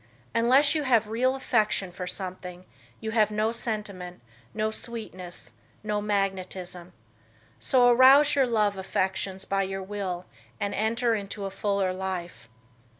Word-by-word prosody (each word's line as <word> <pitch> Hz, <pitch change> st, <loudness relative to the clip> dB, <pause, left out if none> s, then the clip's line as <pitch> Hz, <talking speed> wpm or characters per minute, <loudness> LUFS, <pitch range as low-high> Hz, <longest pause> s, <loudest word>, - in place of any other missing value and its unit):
Unless 255 Hz, +6 st, +4 dB
you 310 Hz, -, 0 dB
have 235 Hz, -6 st, +2 dB
real 255 Hz, +4 st, +1 dB
affection 215 Hz, -7 st, +1 dB
for 180 Hz, 0 st, -6 dB
something, 180 Hz, -1 st, -6 dB, 0.3 s
you 220 Hz, -1 st, -4 dB
have 215 Hz, -2 st, +3 dB
no 215 Hz, +1 st, 0 dB
sentiment, 210 Hz, -6 st, -4 dB, 0.3 s
no 215 Hz, +7 st, -1 dB
sweetness, 215 Hz, -6 st, -8 dB, 0.3 s
no 210 Hz, -1 st, -1 dB
magnetism. 190 Hz, -3 st, -3 dB, 0.7 s
So 250 Hz, -2 st, +4 dB
arouse 260 Hz, +4 st, +7 dB
your 275 Hz, -2 st, +3 dB
love 210 Hz, -4 st, +1 dB
affections 190 Hz, 0 st, -2 dB
by 195 Hz, 0 st, 0 dB
your 195 Hz, 0 st, -3 dB
will 190 Hz, -3 st, -4 dB, 0.3 s
and 200 Hz, 0 st, -2 dB
enter 230 Hz, +3 st, +1 dB
into 200 Hz, -1 st, -4 dB
a 195 Hz, -, -4 dB
fuller 200 Hz, -2 st, 0 dB
life. 180 Hz, -10 st, -5 dB
205 Hz, 135 wpm, -27 LUFS, 185-230 Hz, 0.7 s, arouse